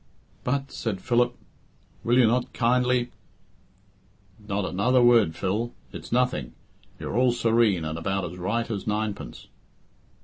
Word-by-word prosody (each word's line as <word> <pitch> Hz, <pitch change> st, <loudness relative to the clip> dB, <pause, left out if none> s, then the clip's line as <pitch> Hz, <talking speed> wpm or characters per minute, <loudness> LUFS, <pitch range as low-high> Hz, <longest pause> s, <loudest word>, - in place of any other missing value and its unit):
"But," 135 Hz, +2 st, -1 dB
said 105 Hz, -5 st, -3 dB
Philip, 120 Hz, +2 st, +1 dB, 0.7 s
"will 120 Hz, +2 st, +3 dB
you 125 Hz, -, +6 dB
not 120 Hz, +2 st, +1 dB
kindly 125 Hz, 0 st, +2 dB, 0.6 s
" 95 Hz, +1 st, -34 dB
"Not 100 Hz, 0 st, -1 dB
another 125 Hz, +8 st, +2 dB
word, 115 Hz, -9 st, +5 dB
Phil. 105 Hz, +7 st, -2 dB, 0.2 s
It's -, -, -9 dB
nothing. 120 Hz, -, 0 dB, 0.4 s
You're -, -, -5 dB
all 125 Hz, 0 st, +3 dB
serene, 115 Hz, -7 st, +2 dB
and 80 Hz, +1 st, -4 dB
about 95 Hz, +2 st, -1 dB
as 90 Hz, +1 st, -8 dB
right 115 Hz, +6 st, -1 dB
as 100 Hz, -1 st, -4 dB
ninepence." 105 Hz, -1 st, -3 dB
115 Hz, 135 wpm, -26 LUFS, 95-120 Hz, 0.7 s, you